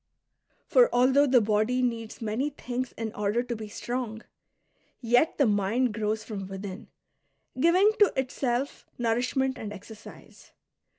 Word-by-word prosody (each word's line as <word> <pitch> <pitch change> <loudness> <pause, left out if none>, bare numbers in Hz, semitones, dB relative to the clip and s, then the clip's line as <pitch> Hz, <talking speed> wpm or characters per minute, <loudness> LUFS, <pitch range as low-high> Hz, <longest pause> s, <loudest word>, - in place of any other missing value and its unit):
For - - +5
although 265 +4 +4
the 250 -2 +5
body 215 +4 +1
needs 230 -2 -3
many 225 +7 -1
things 255 -3 -5
in 225 -1 -5
order 210 +3 0
to 245 -1 -4
be 215 -1 -7
strong, 230 +1 -5 0.8
yet 245 +6 +2
the 280 - +4
mind 215 +3 +1
grows 215 0 -2
from 205 -4 -6
within, 195 +2 -7 0.7
giving 365 +8 +5
to 415 - +6
itself 260 0 -2
nourishment 250 +3 0
and 210 - -6
exercise. 210 +2 -13
240 Hz, 130 wpm, -27 LUFS, 215-260 Hz, 0.8 s, to